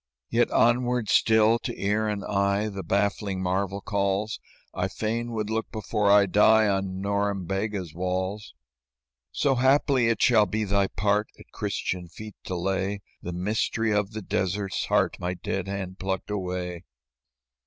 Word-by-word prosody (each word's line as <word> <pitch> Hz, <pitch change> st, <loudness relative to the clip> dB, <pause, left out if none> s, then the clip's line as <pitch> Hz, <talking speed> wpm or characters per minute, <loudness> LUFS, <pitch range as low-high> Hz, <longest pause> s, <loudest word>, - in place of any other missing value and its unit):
"Yet -, -, +3 dB
onward 120 Hz, -1 st, +2 dB
still 110 Hz, +1 st, +4 dB
to -, -, -5 dB
ear 105 Hz, +2 st, +1 dB
and 105 Hz, -1 st, -3 dB
eye 100 Hz, +1 st, +1 dB
The 100 Hz, -2 st, -5 dB
baffling 100 Hz, +1 st, 0 dB
marvel 95 Hz, +2 st, -1 dB
calls; 100 Hz, +1 st, -1 dB, 0.3 s
I 90 Hz, -, -1 dB
fain 115 Hz, +4 st, -3 dB
would 110 Hz, -1 st, -2 dB
look 110 Hz, 0 st, -2 dB
before 105 Hz, -1 st, 0 dB
I 100 Hz, 0 st, +7 dB
die 110 Hz, +3 st, +5 dB
On 95 Hz, -1 st, -1 dB
Norembega's 100 Hz, -2 st, -2 dB
walls. 95 Hz, 0 st, -3 dB, 0.8 s
"So, 140 Hz, -, +2 dB
haply, 130 Hz, -1 st, +3 dB
it 115 Hz, -, +1 dB
shall 110 Hz, -4 st, +5 dB
be 110 Hz, +3 st, -1 dB
thy 100 Hz, -1 st, +1 dB
part 105 Hz, +3 st, 0 dB
At -, -, -16 dB
Christian 90 Hz, -2 st, -3 dB
feet 105 Hz, +5 st, -10 dB
to 90 Hz, -, -3 dB
lay 95 Hz, +3 st, -1 dB, 0.2 s
The 90 Hz, -, -5 dB
mystery 110 Hz, +4 st, 0 dB
of 105 Hz, 0 st, 0 dB
the 110 Hz, -1 st, -5 dB
desert's 95 Hz, +1 st, -1 dB
heart -, -, +1 dB
My 90 Hz, 0 st, -2 dB
dead 95 Hz, +1 st, -3 dB
hand 95 Hz, -1 st, -5 dB
plucked 95 Hz, +1 st, -3 dB
away. 90 Hz, -3 st, -3 dB
100 Hz, 150 wpm, -26 LUFS, 95-110 Hz, 0.8 s, I